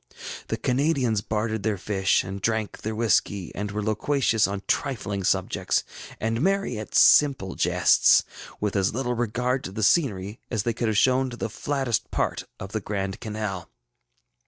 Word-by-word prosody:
The -, -, -2 dB
Canadians 125 Hz, -5 st, +1 dB
bartered 110 Hz, +1 st, -2 dB
their 105 Hz, -1 st, -1 dB
fish 95 Hz, 0 st, +1 dB
and 95 Hz, +1 st, -6 dB
drank 110 Hz, 0 st, -1 dB
their 110 Hz, 0 st, -4 dB
whiskey, 105 Hz, -4 st, 0 dB
and 105 Hz, +1 st, -4 dB
were 105 Hz, +1 st, -3 dB
loquacious 110 Hz, +1 st, +1 dB
on 100 Hz, 0 st, -5 dB
trifling 105 Hz, -8 st, -1 dB
subjects, -, -, 0 dB, 0.4 s
and 115 Hz, +2 st, -1 dB
merry 195 Hz, -, 0 dB
at 110 Hz, -, -8 dB
simple 135 Hz, -10 st, +5 dB
jests, -, -, +4 dB, 0.4 s
with 105 Hz, -1 st, -2 dB
as 100 Hz, +1 st, +1 dB
little 125 Hz, -1 st, -1 dB
regard 125 Hz, +2 st, -1 dB
to -, -, -5 dB
the 110 Hz, +2 st, -3 dB
scenery 105 Hz, -, +1 dB
as 110 Hz, -4 st, -1 dB
they 115 Hz, -, 0 dB
could 115 Hz, +1 st, -2 dB
have 110 Hz, -2 st, 0 dB, 0.3 s
to 120 Hz, -, -8 dB
the 115 Hz, -, -4 dB
flattest 135 Hz, -2 st, -2 dB
part -, -, -2 dB
of 95 Hz, +1 st, -7 dB
the 110 Hz, -, -2 dB
Grand 95 Hz, -1 st, -3 dB
Canal. 105 Hz, -4 st, -5 dB
110 Hz, 160 wpm, -25 LUFS, 100-125 Hz, 0.4 s, simple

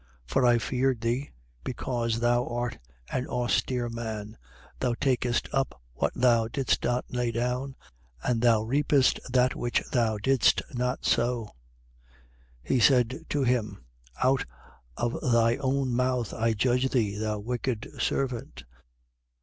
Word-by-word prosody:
19:21. -, -, -7 dB
For 130 Hz, -, +3 dB
I 120 Hz, -1 st, +5 dB
feared 130 Hz, 0 st, 0 dB
thee, 120 Hz, +5 st, -1 dB, 0.3 s
because 120 Hz, -2 st, -2 dB
thou 120 Hz, +1 st, +2 dB
art 120 Hz, 0 st, -3 dB, 0.3 s
an 130 Hz, 0 st, -2 dB
austere 125 Hz, 0 st, 0 dB
man: 110 Hz, -2 st, -5 dB, 0.4 s
thou 125 Hz, -2 st, 0 dB
takest 125 Hz, -2 st, 0 dB
up 135 Hz, -, -1 dB
what -, -, 0 dB
thou 120 Hz, -2 st, +3 dB
didst 130 Hz, +2 st, 0 dB
not 120 Hz, +1 st, 0 dB
lay 125 Hz, -1 st, -1 dB
down: 125 Hz, +3 st, -2 dB, 0.5 s
and 120 Hz, -2 st, 0 dB
thou 115 Hz, -3 st, +4 dB
reapest 135 Hz, +2 st, +2 dB
that 125 Hz, 0 st, +3 dB
which 120 Hz, -, -1 dB
thou 115 Hz, -4 st, +1 dB
didst 130 Hz, +5 st, +3 dB
not 125 Hz, 0 st, -2 dB
sow. 120 Hz, -2 st, +1 dB, 1.2 s
19:22. -, -, +1 dB
He 130 Hz, -, +4 dB
saith 130 Hz, +5 st, +3 dB
to 145 Hz, -1 st, 0 dB
him: 110 Hz, -, -1 dB, 0.4 s
Out 130 Hz, +1 st, +3 dB, 0.5 s
of 120 Hz, 0 st, -2 dB
thy 115 Hz, -2 st, +3 dB
own 135 Hz, -1 st, 0 dB
mouth 125 Hz, -1 st, 0 dB
I 115 Hz, 0 st, +1 dB
judge 125 Hz, +4 st, +1 dB
thee, 110 Hz, -6 st, 0 dB
thou 105 Hz, 0 st, -2 dB
wicked 120 Hz, +1 st, -3 dB
servant. 125 Hz, -4 st, -2 dB
120 Hz, 140 wpm, -27 LUFS, 115-130 Hz, 1.2 s, I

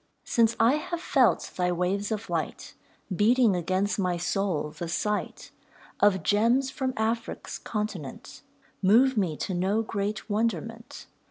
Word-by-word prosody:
Since 230 Hz, -1 st, +2 dB
I 235 Hz, +6 st, +4 dB
have 345 Hz, +2 st, -4 dB
felt 265 Hz, -7 st, +2 dB
thy 180 Hz, -1 st, +1 dB
waves 185 Hz, +4 st, -1 dB
of 220 Hz, 0 st, -3 dB
light, -, -, -4 dB, 0.4 s
Beating 225 Hz, +1 st, +4 dB
against 185 Hz, +4 st, 0 dB
my 180 Hz, -2 st, 0 dB
soul, 175 Hz, -4 st, -1 dB
the 170 Hz, +2 st, -6 dB
sight 210 Hz, +5 st, -2 dB, 0.5 s
Of 190 Hz, -4 st, +3 dB
gems 235 Hz, -, +2 dB
from 260 Hz, -2 st, -2 dB
Afric's 225 Hz, +1 st, -2 dB
continent 210 Hz, -, -5 dB, 0.4 s
Move 240 Hz, +7 st, +5 dB
me 180 Hz, -8 st, 0 dB
to 190 Hz, -, -3 dB
no 195 Hz, +5 st, +1 dB
great 205 Hz, -1 st, -3 dB
wonderment. 225 Hz, +2 st, -3 dB
210 Hz, 135 wpm, -27 LUFS, 185-230 Hz, 0.5 s, Move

